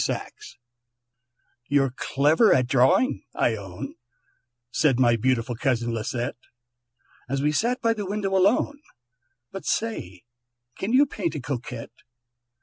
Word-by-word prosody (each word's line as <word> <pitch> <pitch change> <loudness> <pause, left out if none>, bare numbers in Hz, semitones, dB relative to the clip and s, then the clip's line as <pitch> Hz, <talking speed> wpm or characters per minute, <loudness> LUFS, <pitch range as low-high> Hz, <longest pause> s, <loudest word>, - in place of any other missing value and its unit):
SAXE 425 - -5 1.1
"You're 135 -2 +3
clever 150 - +3
at 125 -1 +4
drawing, 135 - +3
I 115 - +2
own," 95 -4 -7 0.8
Said 135 -1 +2
my 120 -2 +5
beautiful 120 +1 0
cousin 120 -1 0
Lisette, 120 +3 -3 0.9
As 135 +1 -1
we 150 - +3
sat 240 - 0
by 230 0 +3
the 205 -3 -5
window 195 -1 -1
alone, 220 +9 +2 0.7
"But 195 - -7
say, 95 - -2 0.5
can 195 - -3
you 270 +4 +6
paint 180 - -3
a - - -2
Coquette?" 125 -4 -5
140 Hz, 125 wpm, -25 LUFS, -, 1.1 s, you